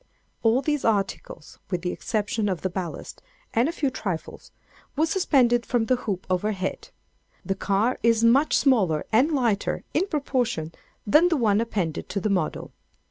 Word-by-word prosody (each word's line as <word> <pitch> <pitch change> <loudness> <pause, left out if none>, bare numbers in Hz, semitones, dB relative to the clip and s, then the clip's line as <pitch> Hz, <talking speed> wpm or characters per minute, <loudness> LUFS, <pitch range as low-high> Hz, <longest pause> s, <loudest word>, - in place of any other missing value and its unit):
All 235 +4 +3
these 295 0 -1
articles, 200 -7 -2
with 180 -1 -2
the 180 - -1
exception 215 0 -2
of 185 -3 -2
the 190 - -2
ballast, 180 -3 -6 0.3
and 240 +6 +2
a - - -1
few 285 -5 -1
trifles, 185 -9 -5 0.4
were 310 +2 +2
suspended 260 -9 +2
from 240 -2 0
the 255 - +2
hoop 205 -7 -4
overhead. 190 +1 -2 0.6
The 195 - 0
car 200 +6 0
is 230 -1 +3
much 265 +6 +4
smaller 195 - +2
and 255 +8 +4
lighter, 235 -8 0
in 365 +6 +1
proportion, 250 - -2 0.3
than 305 +11 +5
the 325 - +1
one 215 -4 +2
appended 195 -9 -3
to 200 - -2
the 210 +2 -1
model. 180 -5 -2
225 Hz, 160 wpm, -25 LUFS, 195-260 Hz, 0.6 s, than